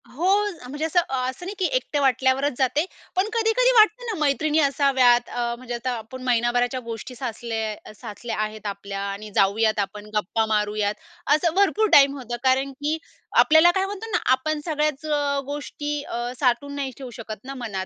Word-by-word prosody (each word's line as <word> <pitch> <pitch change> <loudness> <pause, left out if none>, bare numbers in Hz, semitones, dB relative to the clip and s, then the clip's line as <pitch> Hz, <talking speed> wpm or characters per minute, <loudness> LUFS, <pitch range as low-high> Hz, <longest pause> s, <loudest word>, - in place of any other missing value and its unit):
हो, 330 +8 -2 0.4
म्हणजे 295 +3 -3
असं 325 +2 +2
अ, 270 -6 -2
असं 260 +7 -8
नाही 395 +3 -5
की 375 - +1
एकटे 310 -12 -1
वाटल्यावरच 265 +1 +2
जाते. 275 +5 +1 0.3
पण 375 +3 +2
कधी-कधी 460 +2 +3
वाटतं 435 +3 +5
ना 455 - -2
मैत्रिणी 305 +1 +2
असाव्यात 265 -4 +3
अ, 235 -1 -2
म्हणजे 245 0 -7
आता 250 +2 -3
आपण 230 +4 -9
महिनाभराच्या 245 +1 +1
गोष्टी 230 +2 -7
साचल्या 225 -3 -5
साचल्या 210 +3 -6
आहेत 215 0 -6
आपल्या 200 0 -5
आणि 210 +2 -7
जाऊयात 215 +2 +3
आपण 205 +1 -3
गप्पा 215 +2 0
मारूयात. 210 -1 0 0.4
असं 320 +1 0
भरपूर 400 +2 +3
टाईम 280 0 +7
होतं, 245 -2 -5
कारण 265 +1 +2
की 300 +2 0 0.4
आपल्याला 315 +2 +7
काय 380 0 +2
म्हणतो 410 +3 -6
ना - - +3
आपण 300 +4 +1
सगळ्याच 305 -2 -1
अ, 290 -2 0
गोष्टी 290 +1 -4
अ, 240 -2 -4
साठवून 280 +2 +1
नाही 275 -2 -3
ठेवू 265 -2 -8
शकत 215 -2 -7
ना 270 +1 -7
मनात. 205 -6 -4
260 Hz, 175 wpm, -24 LUFS, 230-305 Hz, 0.4 s, टाईम